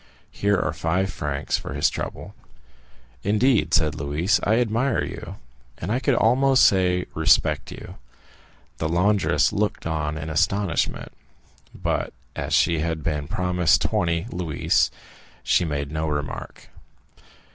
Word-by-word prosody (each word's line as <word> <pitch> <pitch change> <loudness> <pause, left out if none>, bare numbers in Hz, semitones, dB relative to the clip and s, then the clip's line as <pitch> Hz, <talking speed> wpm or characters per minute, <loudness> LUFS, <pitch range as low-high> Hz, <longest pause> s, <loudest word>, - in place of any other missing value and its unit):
Here 100 -1 +1
are - - -1
five 95 +4 -1
francs 70 -1 -2
for 65 - -7
his 70 - +3
trouble." - - -5 0.9
"Indeed," 105 - +2
said 75 -2 +3
Louise, 75 +7 0
"I 110 - +3
admire 120 +2 +1
you, - - -7 0.4
and 90 - -4
I 120 - +1
could 135 -1 +1
almost 130 +4 +4
say 90 -2 +3
respect 80 -3 +2
you." - - -10 0.8
The 80 - -1
laundress 90 -3 +2
looked 105 0 -1
on 75 -2 -2
in 80 +1 -5
astonishment, 90 0 0 0.6
but - - -2 0.2
as - - -1
she 85 -2 +3
had 80 0 -2
been 75 -2 -2
promised 90 -4 +2
twenty 85 +1 0
louis, 85 -5 +1 0.5
she 90 - +2
made 70 -2 -3
no 80 0 -2
remark. 75 -2 -5
85 Hz, 130 wpm, -23 LUFS, 75-100 Hz, 0.9 s, almost